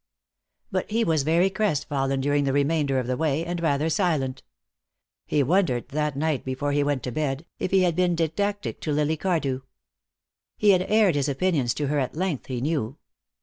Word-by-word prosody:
But - - -2
he 225 +2 +1
was 160 -6 +2
very 170 +6 +2
crestfallen 140 -9 0
during 145 +1 +1
the 135 - 0
remainder 145 -1 +1
of 130 - 0
the 125 +1 -1
way, 155 +2 0
and 175 0 -3
rather 150 -1 +1
silent. 155 -6 0 0.9
He 145 - +2
wondered, 145 -5 +1
that 150 0 -1
night 155 -2 0
before 135 +2 -2
he 145 0 +2
went 145 -2 -1
to 125 - -3
bed, 145 +2 -2
if - - -1
he 190 0 +4
had 175 -3 +1
been 180 -1 +2
didactic 200 +6 -2
to 155 - -2
Lily 150 +2 +1
Cardew. 155 -6 -1 1.0
He 210 - +5
had 185 -2 +4
aired 215 -4 +4
his 145 0 0
opinions 140 -5 0
to 150 - -1
her 145 +1 0
at 130 0 -2
length, 175 -5 -2
he 125 -2 -3
knew. 140 -3 -2
150 Hz, 190 wpm, -25 LUFS, 135-175 Hz, 1.0 s, He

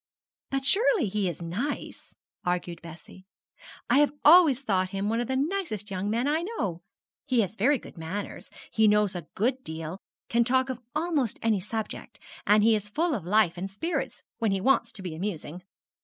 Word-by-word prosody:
'But 270 -1 -2
surely 410 - +4
he 200 -2 0
is 170 0 -6
nice,' 220 - -4 0.3
argued 175 -1 -2
Bessie; 170 +3 -12 0.6
'I 280 - +4
have 295 -1 +3
always 300 -5 +7
thought 185 -6 +1
him 195 +1 -2
one 225 +1 0
of 240 - -1
the 265 - -1
nicest 275 - -2
young 190 +2 -2
men 235 +5 0
I 310 +3 +1
know. 210 - -3 0.5
He 250 -3 +3
has 200 +1 -3
very 270 +8 +3
good 190 - -13
manners, 185 +6 -5 0.2
he 220 -1 +4
knows 210 -2 +3
a 170 -3 -6
good 255 +5 0
deal, 160 +3 -6 0.3
can 235 0 +3
talk 260 +2 +2
of 250 -1 -7
almost 305 -7 0
any 220 -3 +2
subject, 220 +3 -6 0.3
and 210 0 +5
he 225 +1 +5
is 210 -1 -3
full 320 +8 0
of 200 - -3
life 205 -3 +3
and 190 +2 -4
spirits, 325 - -3 0.2
when 225 -2 +1
he 195 -1 +1
wants 270 +8 +2
to 195 - -7
be 180 -3 -4
amusing.' 175 -1 -5
215 Hz, 185 wpm, -27 LUFS, 185-265 Hz, 0.6 s, always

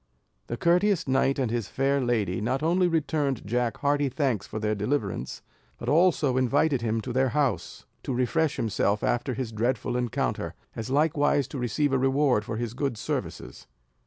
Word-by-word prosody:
The 120 - -4
courteous 180 - +2
knight 135 +1 +2
and 130 -5 0
his 115 -4 -2
fair 135 +1 +1
lady, 110 -7 0
not 130 +6 -1
only 175 +3 +3
returned 150 - 0
Jack 120 +2 -1
hearty 145 -1 +1
thanks 130 -6 -1
for 110 - -6
their 105 0 0
deliverance, 105 - -2 0.3
but 120 - -4
also 155 -4 +3
invited 135 +1 +2
him 115 -1 -1
to 125 +2 -5
their 130 +1 +2
house, 135 -7 -1 0.2
to - - -4
refresh 145 +5 +1
himself 105 -1 0
after 120 +1 0
his 130 -4 -4
dreadful 120 +2 -1
encounter, 125 -2 -2 0.2
as 115 +2 -5
likewise 145 -1 +2
to 135 - -5
receive 130 +4 0
a 135 - +3
reward 135 -3 +2
for 110 0 -4
his 120 -1 -3
good 135 -2 -2
services. - - -5
130 Hz, 170 wpm, -27 LUFS, 115-145 Hz, 0.3 s, only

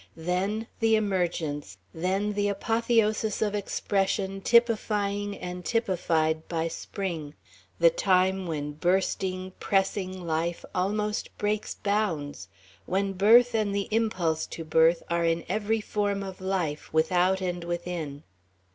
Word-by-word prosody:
Then 185 +6 -1
the 225 -1 +4
emergence, 170 - -1 0.2
then 190 +5 0
the 205 0 +1
apotheosis 220 0 +1
of 210 -2 0
expression 195 -1 -1
typifying 205 -3 +2
and 180 0 -6
typified 165 -8 0
by 165 -1 -1
Spring 165 -6 -5 0.4
the - - +6
time 190 - +2
when 150 -3 -3
bursting, 185 +3 0
pressing 190 -2 0
life 165 +1 -1
almost 210 +3 -1
breaks 210 0 -1
bounds, 165 - -1 0.4
when 195 +1 0
birth 230 +6 +6
and 210 -3 0
the 200 -1 -1
impulse 185 -8 0
to 165 - -6
birth 160 +2 +4
are 170 0 0
in 165 0 +1
every 215 +3 0
form 205 -1 -1
of 190 -1 -8
life, 180 -6 -2
without 180 +4 +3
and 180 -2 -3
within. 170 -4 -4
190 Hz, 120 wpm, -27 LUFS, 170-210 Hz, 0.4 s, the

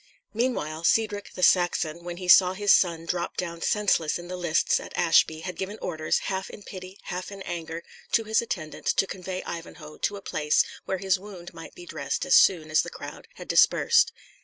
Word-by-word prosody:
Meanwhile, 170 -10 -2
Cedric 210 0 +1
the 180 - -5
Saxon, 170 -3 +2
when 175 0 -6
he 180 0 -7
saw 180 +1 +7
his 205 +1 +4
son 165 -3 +2
drop 175 0 -3
down 170 -2 -4
senseless 195 -7 +1
in 175 0 -10
the 180 - -4
lists 170 -3 +1
at - - -9
Ashby, 160 -1 +3
had 180 +2 -6
given 195 +3 -5
orders, 155 -3 -1
half 190 0 -3
in 205 - -11
pity, 185 0 -10
half 180 +2 -5
in 195 -1 -8
anger, 165 -1 -5 0.3
to 225 - +4
his 220 0 +2
attendants 170 -9 -3
to - - +2
convey 185 -1 -6
Ivanhoe 165 -2 -8
to 205 - -1
a - - -10
place 150 -4 +2 0.2
where 190 - -2
his 190 0 +1
wound 185 -4 -11
might 165 -1 -11
be 355 - -11
dressed - - -3
as - - +1
soon 160 -4 +5
as 155 - +4
the - - -6
crowd - - -10
had - - -10
dispersed. - - +4
180 Hz, 200 wpm, -26 LUFS, 165-195 Hz, 0.3 s, saw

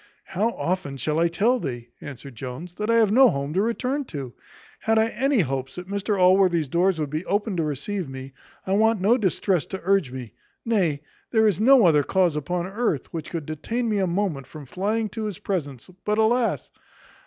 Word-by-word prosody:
"How 200 +5 0
often 170 -6 -2
shall 150 +4 -1
I 170 - +4
tell 220 +9 +1
thee," 120 - -5
answered 140 -1 -9
Jones, 130 +9 -7
"that 210 +4 -4
I 230 - +4
have 220 -3 +4
no 255 +3 +7
home 140 -1 -3
to 190 - +2
return 250 +6 -1
to? 135 - -7 0.5
Had 225 0 +1
I 220 +1 +3
any 260 +1 +1
hopes 135 -3 -3
that 180 0 -7
Mr 200 +1 -1
Allworthy's 180 -4 +4
doors 175 +3 +2
would 150 -3 -2
be 155 +3 -2
open 205 0 0
to 165 - +1
receive 155 +4 -3
me, 135 0 -8 0.3
I 190 - -1
want 220 +1 +3
no 205 +6 +4
distress 190 - 0
to 190 - -6
urge 190 -7 +2
me 125 -4 -8 0.3
nay, 175 -11 +1 0.3
there 220 -2 +3
is 205 -1 +1
no 255 -2 +6
other 155 -4 +5
cause 180 0 +1
upon 170 +4 -2
earth, 195 - -2
which 160 -2 -5
could 165 -4 -4
detain 225 - -3
me 210 -2 +1
a 190 - +1
moment 170 -7 -2
from 155 -2 -10
flying 210 - -1
to 220 +2 -5
his 205 -5 -4
presence; 145 - -4 0.2
but, 210 0 0
alas! 230 +2 +1
185 Hz, 200 wpm, -24 LUFS, 150-215 Hz, 0.5 s, no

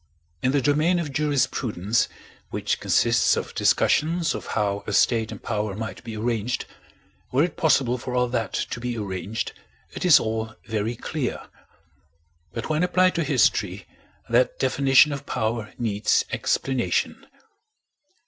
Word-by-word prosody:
In 130 - +2
the 140 -1 +1
domain 155 +6 +3
of 155 -5 -3
jurisprudence, 125 -7 0 0.4
which - - -2
consists - - +3
of - - -4
discussions 165 +2 +2
of - - -6
how 100 -1 0
a 105 - -2
state 115 +1 +2
and - - -9
power 105 -3 -2
might 110 +1 -6
be 110 -2 -6
arranged 115 +1 -1 0.7
were 135 +4 +3
it 175 - -2
possible 130 -6 +2
for 125 +1 -5
all 125 0 +2
that 115 -5 -2
to - - -3
be 120 0 -3
arranged, 100 +2 -4 0.4
it - - -6
is 180 -4 +7
all 110 0 -3
very 110 +2 -2
clear; 135 +2 -4 1.1
but 115 - -5
when 155 0 0
applied 185 +1 +3
to 170 - 0
history - - +1 0.4
that - - +2
definition 140 - +4
of 140 0 -6
power 110 0 -2
needs 105 -3 +1
explanation. 130 -3 -1
120 Hz, 140 wpm, -24 LUFS, 110-145 Hz, 1.1 s, is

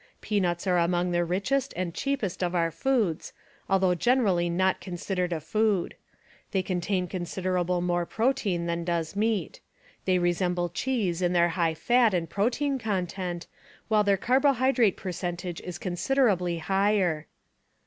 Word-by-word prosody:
Peanuts 180 -5 -1
are 180 -2 +3
among 175 +1 +1
the 175 0 +2
richest 245 +11 -1
and 175 -2 -3
cheapest 260 -10 -2
of 180 0 -1
our 165 -1 +1
foods, 220 -8 0 0.4
although 190 -2 +3
generally 195 -5 +2
not 185 +2 +1
considered 180 0 -3
a 165 - -1
food. 210 +2 0 0.6
They 190 -2 0
contain 185 0 -1
considerable 180 0 -1
more 175 -1 0
protein 220 -8 0
than 170 0 -2
does 170 -1 -2
meat. 210 -4 -1 0.5
They 185 -1 +3
resemble 175 0 0
cheese 200 -7 -1
in 175 0 +1
their 175 0 +4
high 165 -2 0
fat 240 +2 +3
and 170 -2 -1
protein 250 - 0
content, 185 -4 -3 0.4
while 215 -1 +4
their 200 -1 +3
carbohydrate 260 -2 +3
percentage 175 -1 -4
is 180 -2 -6
considerably 180 -2 +1
higher. 190 -2 +1
180 Hz, 140 wpm, -27 LUFS, 175-210 Hz, 0.6 s, their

